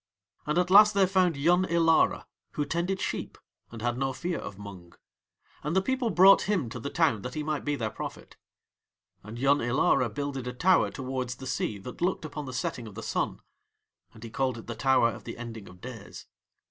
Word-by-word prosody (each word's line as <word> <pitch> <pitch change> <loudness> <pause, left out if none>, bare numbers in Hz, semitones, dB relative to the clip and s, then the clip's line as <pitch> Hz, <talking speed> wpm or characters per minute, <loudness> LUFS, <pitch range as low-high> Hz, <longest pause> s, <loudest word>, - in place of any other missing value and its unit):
And 150 +2 0
at 180 0 +1
last 210 +1 +8
they 195 -1 +5
found 185 -4 +2
Yun 175 +6 +3
Ilara, 165 -2 +3 0.3
who 145 - -1
tended 170 +6 -1
sheep - - -4 0.3
and 115 -1 -9
had 120 +1 -1
no 135 -1 -1
fear 170 +5 -3
of 100 -1 -8
Mung, 95 -4 -11 0.7
and 150 +4 -3
the 190 - +4
people 260 0 0
brought 195 0 +6
him 175 - 0
to 120 - -6
the 140 - -4
town 145 -10 +1
that 125 +3 -6
he 155 - -2
might 150 -1 -2
be 145 0 -1
their 110 -5 -3
prophet. - - -8 0.9
And 105 +3 -9
Yun 140 +3 +3
Ilara 120 0 +2
builded 135 +1 -4
a 125 - -4
tower 180 +9 +3
towards 130 -2 -4
the 130 - -10
sea 110 -4 -2
that 110 +10 -10
looked 175 -2 0
upon 150 -1 -6
the - - -5
setting 125 -2 -3
of 105 - -11
the 115 - -7
Sun. - - -2 0.7
And 110 -1 -14
he 115 - -8
called 130 0 -1
it 115 - -10
the 120 - -5
Tower 120 0 +3
of - - -10
the - - -7
Ending 115 -4 -8
of 90 0 -16
Days. 120 -5 -9
135 Hz, 210 wpm, -28 LUFS, 115-170 Hz, 0.9 s, last